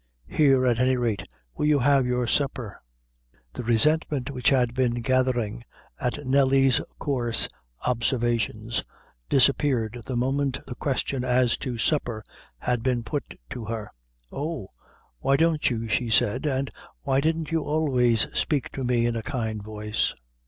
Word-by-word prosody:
Here, 135 Hz, -4 st, +4 dB
at 120 Hz, -2 st, +2 dB
any 130 Hz, 0 st, +3 dB
rate, 115 Hz, -5 st, -1 dB, 0.3 s
will 150 Hz, -, -1 dB
you 150 Hz, -1 st, +4 dB
have 135 Hz, -1 st, +3 dB
your 125 Hz, 0 st, 0 dB
supper?" 125 Hz, -5 st, -2 dB, 0.7 s
The -, -, -5 dB
resentment 140 Hz, +3 st, +2 dB
which 125 Hz, -3 st, +1 dB
had 125 Hz, -3 st, +2 dB
been 125 Hz, -2 st, +1 dB
gathering 120 Hz, -3 st, 0 dB, 0.4 s
at 135 Hz, +3 st, -3 dB
Nelly's 135 Hz, -1 st, +4 dB, 0.2 s
coarse 120 Hz, -5 st, +2 dB, 0.4 s
observations, 115 Hz, -2 st, 0 dB, 0.5 s
disappeared 125 Hz, -4 st, +2 dB
the 130 Hz, -, -2 dB
moment 135 Hz, +2 st, 0 dB
the 130 Hz, -, -6 dB
question 135 Hz, 0 st, -2 dB
as 125 Hz, -1 st, +2 dB
to 125 Hz, -3 st, -4 dB
supper 120 Hz, -4 st, 0 dB, 0.3 s
had 120 Hz, -, -1 dB
been 125 Hz, -1 st, 0 dB
put 145 Hz, +4 st, -5 dB
to 115 Hz, -, -5 dB
her. 110 Hz, -1 st, -5 dB, 0.4 s
"Oh! 150 Hz, -, -4 dB, 0.5 s
why 135 Hz, -, +2 dB
don't 160 Hz, -1 st, +2 dB
you," 115 Hz, -2 st, -3 dB
she 115 Hz, +2 st, 0 dB
said; 115 Hz, +5 st, +2 dB
"and 135 Hz, -1 st, -1 dB, 0.3 s
why 135 Hz, -1 st, +2 dB
didn't 160 Hz, +1 st, -1 dB
you 165 Hz, -1 st, +1 dB
always 130 Hz, -7 st, +2 dB
spake 145 Hz, -4 st, 0 dB
to 135 Hz, -, -5 dB
me 120 Hz, -1 st, +2 dB
in 120 Hz, -1 st, 0 dB
a 115 Hz, -, -2 dB
kind 110 Hz, -3 st, -3 dB
voice?" 105 Hz, 0 st, -2 dB
125 Hz, 145 wpm, -25 LUFS, 115-140 Hz, 0.7 s, Here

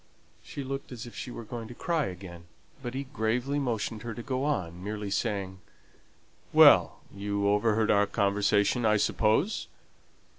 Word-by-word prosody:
She 140 Hz, -, -7 dB
looked 135 Hz, +1 st, -5 dB
as 120 Hz, -3 st, -7 dB
if 120 Hz, -, -10 dB
she -, -, -6 dB
was 115 Hz, -2 st, -8 dB
going 115 Hz, -1 st, -6 dB
to 120 Hz, -, -10 dB
cry 165 Hz, -1 st, 0 dB
again, 90 Hz, -2 st, -9 dB, 0.4 s
but 125 Hz, -1 st, -5 dB
he 135 Hz, -, -2 dB
gravely 130 Hz, +1 st, -1 dB
motioned 115 Hz, -4 st, -2 dB
her 115 Hz, 0 st, -6 dB
to 120 Hz, -, -7 dB
go 130 Hz, 0 st, -2 dB
on, 90 Hz, -, -2 dB
merely 105 Hz, 0 st, -4 dB
saying, 100 Hz, -3 st, -2 dB, 0.9 s
"Well! -, -, +6 dB
you 100 Hz, 0 st, -1 dB
overheard 105 Hz, +1 st, +2 dB
our 100 Hz, 0 st, +4 dB
conversation, 100 Hz, +4 st, +2 dB
I 110 Hz, -1 st, +4 dB
suppose?" 110 Hz, -, +1 dB
110 Hz, 155 wpm, -28 LUFS, 100-125 Hz, 0.9 s, Well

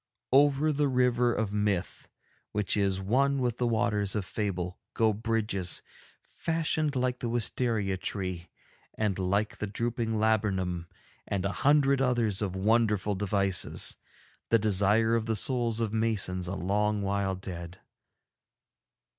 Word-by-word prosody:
Over 145 Hz, +3 st, +4 dB
the 145 Hz, 0 st, +1 dB
River 125 Hz, -2 st, +2 dB
of 110 Hz, -3 st, -2 dB
Myth, 105 Hz, -3 st, -1 dB, 0.5 s
which 105 Hz, -2 st, -1 dB
is 100 Hz, -2 st, +1 dB
one 135 Hz, +8 st, +1 dB
with 125 Hz, -3 st, -1 dB
the 125 Hz, -, +1 dB
Waters 105 Hz, -3 st, 0 dB
of 105 Hz, -3 st, -1 dB
Fable, 90 Hz, -4 st, -3 dB, 0.2 s
go 110 Hz, -1 st, +3 dB
bridges, 105 Hz, -4 st, -1 dB, 0.4 s
fashioned 160 Hz, -3 st, -1 dB
like 125 Hz, -1 st, 0 dB
the 120 Hz, -, -3 dB
wisteria 115 Hz, -4 st, -1 dB
tree 90 Hz, -2 st, -4 dB, 0.5 s
and 105 Hz, -3 st, -1 dB
like 100 Hz, +3 st, 0 dB
the 105 Hz, -, -3 dB
drooping 115 Hz, +1 st, -2 dB
laburnum, 95 Hz, -6 st, 0 dB, 0.4 s
and 95 Hz, -1 st, -2 dB
a 100 Hz, -, 0 dB
hundred 140 Hz, 0 st, +3 dB
others 120 Hz, -6 st, +1 dB
of 95 Hz, -3 st, -2 dB
wonderful 105 Hz, 0 st, +2 dB
devices, 100 Hz, -1 st, +1 dB, 0.5 s
the 115 Hz, -, +5 dB
desire 105 Hz, +2 st, +2 dB
of 115 Hz, -1 st, -1 dB
the 110 Hz, -, 0 dB
souls 120 Hz, 0 st, +1 dB
of 110 Hz, -2 st, -1 dB
masons 105 Hz, -5 st, +1 dB
a 95 Hz, -, -3 dB
long 105 Hz, +3 st, 0 dB
while 100 Hz, -1 st, 0 dB
dead. 90 Hz, -2 st, -8 dB
105 Hz, 135 wpm, -29 LUFS, 95-120 Hz, 0.5 s, the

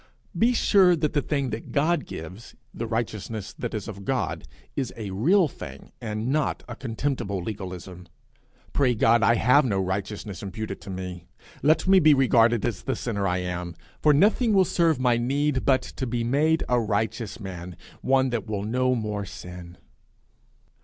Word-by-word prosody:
Be 230 Hz, +2 st, +4 dB
sure 190 Hz, -6 st, +5 dB
that 150 Hz, -2 st, -1 dB
the 145 Hz, -, +2 dB
thing 140 Hz, -3 st, -1 dB
that 110 Hz, +1 st, -6 dB
God 160 Hz, +4 st, +1 dB
gives, 90 Hz, +8 st, -9 dB, 0.2 s
the 115 Hz, -, -4 dB
righteousness 110 Hz, -2 st, -3 dB
that 120 Hz, -2 st, -3 dB
is 105 Hz, -, -4 dB
of 100 Hz, -3 st, -7 dB
God, -, -, -2 dB, 0.3 s
is 135 Hz, -3 st, -2 dB
a 105 Hz, -4 st, -5 dB
real 165 Hz, -, +3 dB
thing, 70 Hz, -, -10 dB
and 110 Hz, +1 st, -3 dB
not 150 Hz, +1 st, 0 dB
a -, -, -6 dB
contemptible 120 Hz, -4 st, -2 dB
legalism. 90 Hz, -2 st, -7 dB, 0.7 s
Pray 130 Hz, -4 st, +2 dB
God 115 Hz, +1 st, +4 dB
I 115 Hz, +3 st, +4 dB
have 125 Hz, +6 st, +5 dB
no 105 Hz, -7 st, 0 dB
righteousness 100 Hz, 0 st, -3 dB
imputed 100 Hz, 0 st, -5 dB
to -, -, -10 dB
me. 90 Hz, -2 st, -6 dB, 0.3 s
Let 155 Hz, +6 st, +3 dB
me 190 Hz, 0 st, +7 dB
be 155 Hz, -3 st, +6 dB
regarded 120 Hz, -4 st, +4 dB
as -, -, -2 dB
the -, -, -2 dB
sinner 100 Hz, -5 st, -2 dB
I 90 Hz, 0 st, 0 dB
am; 90 Hz, -1 st, -4 dB, 0.3 s
for 150 Hz, -, +5 dB
nothing 210 Hz, -, +3 dB
will 190 Hz, -2 st, +5 dB
serve 165 Hz, -5 st, +2 dB
my 125 Hz, -2 st, +3 dB
need 135 Hz, +3 st, 0 dB
but 130 Hz, -2 st, +3 dB
to 130 Hz, -, -5 dB
be 120 Hz, 0 st, -1 dB
made 150 Hz, +7 st, +2 dB
a 125 Hz, -1 st, +3 dB
righteous 110 Hz, +1 st, -2 dB
man, 90 Hz, -3 st, -7 dB, 0.3 s
one 130 Hz, -1 st, +2 dB
that 120 Hz, -4 st, -2 dB
will 105 Hz, -2 st, -3 dB
no 130 Hz, +4 st, +1 dB
more 105 Hz, -3 st, -3 dB
sin. 90 Hz, -2 st, -10 dB
115 Hz, 175 wpm, -25 LUFS, 100-140 Hz, 0.7 s, me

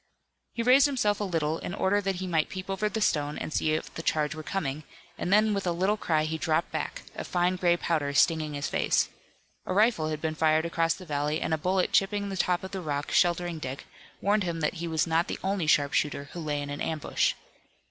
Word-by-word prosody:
He 235 Hz, -, -2 dB
raised 260 Hz, +4 st, +6 dB
himself 215 Hz, -7 st, +1 dB
a -, -, -1 dB
little 165 Hz, -3 st, -1 dB
in 175 Hz, -, -5 dB
order 200 Hz, +2 st, +2 dB
that 195 Hz, -1 st, -1 dB
he 185 Hz, +1 st, -4 dB
might 165 Hz, -4 st, +1 dB
peep 185 Hz, 0 st, -6 dB
over 210 Hz, +2 st, 0 dB
the 220 Hz, +2 st, -3 dB
stone 150 Hz, -6 st, +1 dB
and 155 Hz, -, -5 dB
see 155 Hz, -, +1 dB
if 155 Hz, -, -3 dB
the -, -, -5 dB
charge 155 Hz, -2 st, 0 dB
were 155 Hz, -, -7 dB
coming, 155 Hz, -4 st, -3 dB, 0.3 s
and 180 Hz, -, -3 dB
then 215 Hz, +1 st, +4 dB
with 195 Hz, -2 st, -2 dB
a -, -, +2 dB
little 190 Hz, +5 st, +1 dB
cry 155 Hz, -7 st, 0 dB
he 160 Hz, +1 st, -3 dB
dropped 160 Hz, +1 st, 0 dB
back, -, -, -4 dB
a -, -, -4 dB
fine 180 Hz, +1 st, +1 dB
gray 175 Hz, -1 st, +2 dB
powder 155 Hz, -5 st, 0 dB
stinging 155 Hz, 0 st, +3 dB
his 145 Hz, 0 st, -2 dB
face. -, -, +1 dB, 0.6 s
A -, -, -1 dB
rifle 210 Hz, -6 st, +3 dB
had 155 Hz, -1 st, -3 dB
been 160 Hz, 0 st, -2 dB
fired 155 Hz, 0 st, +2 dB
across 165 Hz, 0 st, +1 dB
the 185 Hz, -, -11 dB
valley 150 Hz, 0 st, -1 dB
and -, -, -1 dB
a -, -, +2 dB
bullet 185 Hz, +3 st, +1 dB
chipping 200 Hz, +1 st, +1 dB
the 195 Hz, -, -4 dB
top 180 Hz, -1 st, +1 dB
of 190 Hz, -, -6 dB
the 190 Hz, -2 st, -4 dB
rock 145 Hz, -3 st, -3 dB
sheltering 175 Hz, -1 st, +2 dB
Dick 135 Hz, -2 st, -6 dB, 0.4 s
warned 205 Hz, +2 st, +2 dB
him 170 Hz, -2 st, -3 dB
that 150 Hz, -, +1 dB
he 170 Hz, -, -2 dB
was 160 Hz, -2 st, +1 dB
not 165 Hz, +1 st, +1 dB
the -, -, -3 dB
only 190 Hz, -4 st, 0 dB
sharpshooter 145 Hz, -1 st, +1 dB
who 175 Hz, -, -7 dB
lay 150 Hz, -3 st, -2 dB
in 145 Hz, -, -6 dB
an 145 Hz, -, -5 dB
ambush. 160 Hz, -2 st, 0 dB
170 Hz, 235 wpm, -28 LUFS, 155-190 Hz, 0.6 s, raised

